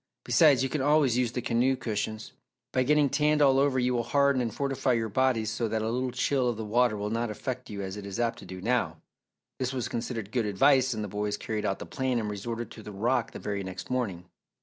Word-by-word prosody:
Besides, 145 -6 +5
you 135 - 0
can 150 - -1
always 145 -3 +3
use 125 -2 +1
the 125 -1 -4
canoe 125 +3 +2
cushions. 110 -3 -4 0.4
By 130 - +2
getting 150 +2 +4
tanned 150 +2 +2
all 135 -2 +5
over 140 -1 +2
you 125 0 +2
will 120 - +1
harden 140 +2 +2
and 115 -2 -1
fortify 135 0 0
your 115 -1 0
bodies 115 -2 +1
so 115 +1 -1
that 110 0 -1
a 110 - -1
little 130 +2 -1
chill 130 0 +1
of 120 - -3
the 110 - -4
water 115 0 +2
will 105 +1 -3
not 115 +1 -1
affect 125 +4 -5
you 100 -1 -5
as 95 0 -5
it 100 -1 -7
is 100 +3 -5
apt 115 -1 0
to - - -11
do 95 0 -8
now." 125 +4 0 0.6
This 130 0 -1
was 125 -3 -2
considered 115 -3 -4
good 115 -2 0
advice 130 +4 +3
and 110 - -3
the - - -3
boys 105 +1 -2
carried 110 -2 -3
out 95 - -1
the - - -7
plan 130 -2 -1
and 105 -2 -2
resorted 115 +3 -5
to 110 - -10
the 105 - -9
rock 115 +4 0
the - - -7
very 100 -1 -3
next 95 +6 -7
morning. 100 -9 -2
120 Hz, 245 wpm, -28 LUFS, 105-130 Hz, 0.6 s, Besides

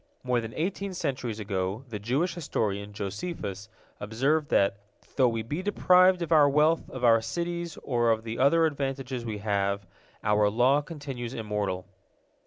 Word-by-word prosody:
More 125 -2 +1
than 115 0 -7
eighteen 190 +3 -2
centuries 130 -9 -3
ago 100 +3 -3
the 105 -3 -5
Jewish 130 - 0
historian 105 - -2
Josephus 100 - -5 0.3
observed 135 +9 0
that 100 0 +3 0.4
"though 130 -2 +4
we 115 -1 -2
be 145 +10 -3
deprived 185 -2 +4
of 170 - -6
our 150 -3 +6
wealth, 150 +3 +2
of 130 - -7
our 115 -2 +6
cities, 170 +6 -4
or 120 -3 +1
of 110 -1 +1
the 115 +1 -5
other 160 +5 +5
advantages 135 -4 -3
we 110 -2 -3
have, 100 -1 -1 0.4
our 105 0 +3
law 125 +7 +3
continues 135 -6 -6
immortal." 105 -4 -2
120 Hz, 155 wpm, -28 LUFS, 105-155 Hz, 0.4 s, our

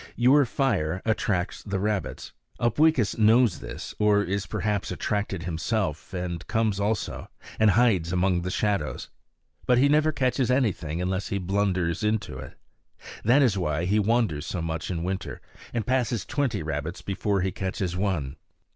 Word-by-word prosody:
Your 130 +4 +5
fire 95 - 0
attracts 105 -5 0
the 100 -2 -3
rabbits. 105 0 -3 0.3
Upweekis 120 -1 +2
knows 110 -3 +4
this, - - -7
or 105 -1 +4
is 100 +2 -2
perhaps 105 -2 -1
attracted 100 -1 -2
himself 90 +1 -2
and 90 -2 -4
comes 110 -3 0
also, 105 0 -2 0.3
and 110 -1 +5
hides 100 -7 +3
among 90 -1 +2
the 90 - -3
shadows. 100 -5 -1 0.6
But 125 - +4
he 140 +3 +4
never 155 +1 +4
catches 130 -2 0
anything 90 - 0
unless 95 +1 -1
he 100 - -2
blunders 95 -2 0
onto 105 0 -1
it. - - -10 0.7
That 125 +6 +5
is 105 -7 +2
why 80 -1 -1
he 105 +4 +2
wanders 105 -8 +1
so 90 - -3
much 80 -1 -3
in 85 -3 -2
winter 95 +1 -4 0.3
and 115 -4 -2
passes 125 -4 0
twenty 135 - -1
rabbits 80 +2 -4
before 100 0 -1
he 95 0 0
catches 95 -2 -3
one. 90 -8 -2
100 Hz, 155 wpm, -26 LUFS, 90-115 Hz, 0.7 s, Your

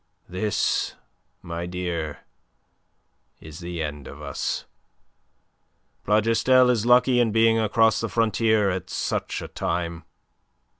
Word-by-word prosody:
"This, 100 +4 -1 0.5
my 85 +1 -5
dear, 85 -4 -4 1.2
is 80 0 -11
the 85 -1 -4
end 75 -2 -6
of 70 - -10
us. 70 -3 -3 1.4
Plougastel 115 +4 +4
is 115 -1 0
lucky 125 0 +5
in 115 -2 +2
being 115 +1 +4
across 110 +1 +3
the 115 - -2
frontier 110 -2 +2
at 90 0 -5
such - - -3
a - - -6
time. 85 0 -3
100 Hz, 110 wpm, -24 LUFS, 85-115 Hz, 1.4 s, lucky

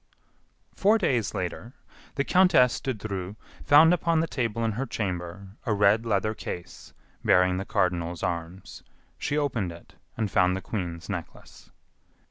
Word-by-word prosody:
Four 210 +3 +3
days 120 - 0
later, 95 +7 -4 0.4
the 140 - +1
countess 180 -9 +4
de 135 - -2
Dreux 100 -4 -5 0.3
found 160 +4 +7
upon 170 -1 +1
the 160 - +2
table 115 -6 -2
in 110 - +1
her 125 +5 -3
chamber 90 -2 -4
a 110 - 0
red 105 +3 +3
leather 110 0 +1
case 90 -5 -8 0.3
bearing 90 0 +4
the 95 - -4
cardinal's 90 -5 -1
arms. 85 +2 -5 0.4
She 145 - -1
opened 120 - -1
it, 85 0 -14 0.2
and 110 -4 -1
found 90 -1 +3
the - - -6
Queen's 85 -6 -5
Necklace. - - -8
105 Hz, 145 wpm, -26 LUFS, 90-125 Hz, 0.4 s, found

